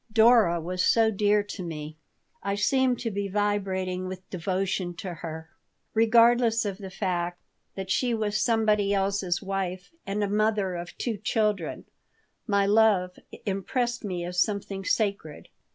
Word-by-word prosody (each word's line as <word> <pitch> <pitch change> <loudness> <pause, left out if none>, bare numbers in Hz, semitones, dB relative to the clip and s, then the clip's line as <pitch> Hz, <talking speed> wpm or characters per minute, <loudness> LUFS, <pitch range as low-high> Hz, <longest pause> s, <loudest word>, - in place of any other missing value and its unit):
Dora 220 -6 +5
was 180 +3 -2
so 225 -1 +4
dear 205 0 +2
to 205 -1 -7
me. 155 -3 -6 0.5
I 200 0 -1
seemed 255 +4 +2
to 230 - -2
be 200 0 -2
vibrating 190 -2 -1
with 185 0 -8
devotion 185 0 -2
to 180 +1 -6
her. 160 -1 -8 0.4
Regardless 230 0 +4
of 200 -1 -3
the 195 -2 -7
fact 175 -2 -2 0.4
that 190 -1 -5
she 250 +3 +1
was 210 -1 -1
somebody 210 -3 +2
else's 195 -2 0
wife 185 -2 -3 0.2
and 205 +1 -1
a - - +1
mother 210 -2 +1
of 175 0 -7
two 230 -4 -2
children, 210 -4 -1 0.6
my 200 -2 +2
love 200 -4 +3 0.3
impressed 240 +5 -1
me 180 -4 -3
as 180 0 0
something 200 -2 -2
sacred. 200 -6 -1
200 Hz, 145 wpm, -27 LUFS, 185-215 Hz, 0.6 s, Dora